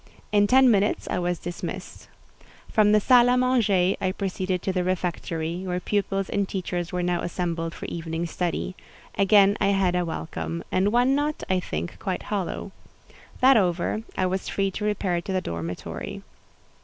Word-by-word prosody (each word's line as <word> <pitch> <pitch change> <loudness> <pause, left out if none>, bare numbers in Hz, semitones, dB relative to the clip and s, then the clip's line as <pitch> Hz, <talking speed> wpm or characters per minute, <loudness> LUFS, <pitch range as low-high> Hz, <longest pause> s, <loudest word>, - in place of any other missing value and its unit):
In 205 -1 +4
ten 260 +2 +6
minutes 205 0 +1
I - - 0
was 175 0 -1
dismissed. 175 +1 -7 0.6
From 210 -1 +4
the 210 - +6
salle 245 +2 +6
à 250 0 +4
manger 215 -8 +3
I 185 - +2
proceeded 185 -2 -2
to 190 - -1
the 180 -1 0
refectory, 175 -1 -2
where 180 -1 -2
pupils 195 0 -1
and 200 -1 -1
teachers 175 -2 -3
were 180 0 -1
now 175 -1 0
assembled 170 -1 -3
for - - -7
evening 165 0 -4
study: 175 +2 -3 0.4
again 200 0 +5
I - - +3
had 195 -2 +2
a 180 - +1
welcome, 165 0 -4
and 195 +2 +2
one 245 +3 +3
not, 295 +2 -1
I 185 - +3
think, 85 - -5
quite 185 -2 -3
hollow. 200 -1 -3 0.7
That 260 0 +7
over, 180 +2 +1 0.2
I 185 - +2
was 185 +1 -2
free 195 -1 0
to 210 +3 -4
repair 190 -4 0
to 195 - -6
the 185 - +2
dormitory. 85 - -5
185 Hz, 170 wpm, -25 LUFS, 175-205 Hz, 0.7 s, That